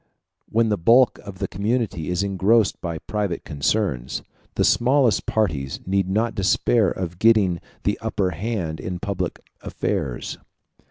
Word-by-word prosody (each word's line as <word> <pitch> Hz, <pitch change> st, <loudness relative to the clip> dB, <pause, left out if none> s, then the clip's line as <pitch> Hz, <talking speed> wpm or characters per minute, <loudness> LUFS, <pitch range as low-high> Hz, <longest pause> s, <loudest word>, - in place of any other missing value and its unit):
When 115 Hz, 0 st, +2 dB
the 105 Hz, -3 st, 0 dB
bulk 120 Hz, +8 st, +5 dB
of 100 Hz, -2 st, -10 dB
the -, -, -2 dB
community 105 Hz, -6 st, -1 dB
is 90 Hz, +2 st, 0 dB
engrossed 100 Hz, +3 st, +2 dB
by 85 Hz, -2 st, -3 dB
private 100 Hz, -1 st, -3 dB
concerns, 70 Hz, -, -1 dB, 0.3 s
the -, -, +2 dB
smallest 125 Hz, -1 st, +3 dB
parties 75 Hz, -11 st, -1 dB
need 95 Hz, 0 st, 0 dB
not 110 Hz, +4 st, +1 dB
despair 100 Hz, +1 st, +2 dB
of 90 Hz, 0 st, -5 dB
getting 105 Hz, -6 st, +4 dB, 0.2 s
the -, -, 0 dB
upper 95 Hz, -2 st, -1 dB
hand 90 Hz, -3 st, -3 dB
in 90 Hz, -, -4 dB
public 95 Hz, -2 st, -4 dB, 0.2 s
affairs. 65 Hz, -4 st, -3 dB
100 Hz, 140 wpm, -23 LUFS, 85-110 Hz, 0.3 s, bulk